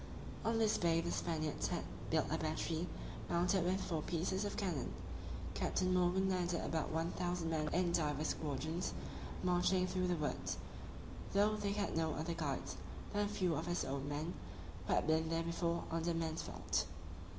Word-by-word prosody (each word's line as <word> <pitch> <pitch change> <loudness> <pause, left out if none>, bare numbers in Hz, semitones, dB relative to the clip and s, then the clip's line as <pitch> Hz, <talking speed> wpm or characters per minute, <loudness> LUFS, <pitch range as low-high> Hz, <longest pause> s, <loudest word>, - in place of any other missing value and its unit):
On 225 0 +2
this 220 -1 +3
bay 165 -1 +4
the 170 +1 -1
Spaniards 155 -3 0
had - - -1 0.3
built - - +3
a - - +2
battery, 160 +2 0 0.4
mounted 180 +2 +3
with 185 +2 +2
four 165 -5 -1
pieces 180 +5 0
of 205 - -3
cannon. 175 - -1 0.6
Captain 185 0 +1
Morgan 180 +1 +4
landed 180 -2 +1
about 160 -1 0
one 165 +2 0
thousand 175 -2 -1
men 155 -1 +1
in 175 -1 +3
divers 155 -3 +1
squadrons, 160 +4 -1 0.5
marching 180 +1 +4
through 185 0 +1
the 180 - +2
woods, 90 - -1 0.8
though 205 +2 +5
they 205 -1 0
had 205 0 0
no 160 -1 +1
other 160 +3 -1
guides 150 -5 -2 0.4
than 205 0 +3
a - - -1
few 185 -5 +1
of 160 +3 -1
his 175 0 +1
own 140 +1 -2
men, 150 +4 -2 0.5
who - - +3
had - - +3
been 160 +1 +3
there 165 0 +1
before, 170 0 0
under 165 +1 +1
Mansvelt. 165 -1 -1
170 Hz, 170 wpm, -38 LUFS, 160-185 Hz, 0.8 s, though